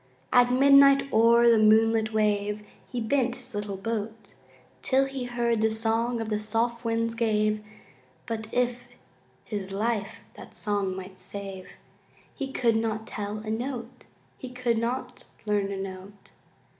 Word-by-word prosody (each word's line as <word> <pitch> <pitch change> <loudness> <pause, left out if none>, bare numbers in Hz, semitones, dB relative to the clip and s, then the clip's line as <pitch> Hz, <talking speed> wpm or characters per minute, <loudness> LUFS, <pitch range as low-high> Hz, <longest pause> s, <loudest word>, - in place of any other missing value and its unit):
At 245 0 +5
midnight 275 +1 +6
o'er 235 +1 +5
the 230 -2 +6
moonlit 220 +1 +4
wave 210 -1 0 0.3
He 250 - -3
bent 245 +1 0
his 250 0 -7
little 205 -1 -4
boat, 220 0 -5 0.5
Till 265 - +2
he 270 -2 -5
heard 235 -2 0
the 220 - +3
song 225 +2 0
the 220 -2 -2
soft 230 +3 -1
winds 230 0 0
gave, 215 -2 0 0.6
But 220 -1 -5
if 245 0 -1 0.6
his 200 -3 -5
life 210 0 -2
that - - -13
song 200 -3 -1
might 190 0 -9
save, 195 -1 -8 0.6
He 270 -1 -5
could 235 -4 +2
not 220 -1 -2
tell 210 0 -5
a 215 - -3
note! 245 +1 -5 0.3
He 255 - -7
could 250 -2 -1
not 250 +2 -4 0.2
learn 205 -2 0
a 195 - -4
note! 195 +1 -9
225 Hz, 145 wpm, -27 LUFS, 210-245 Hz, 0.6 s, midnight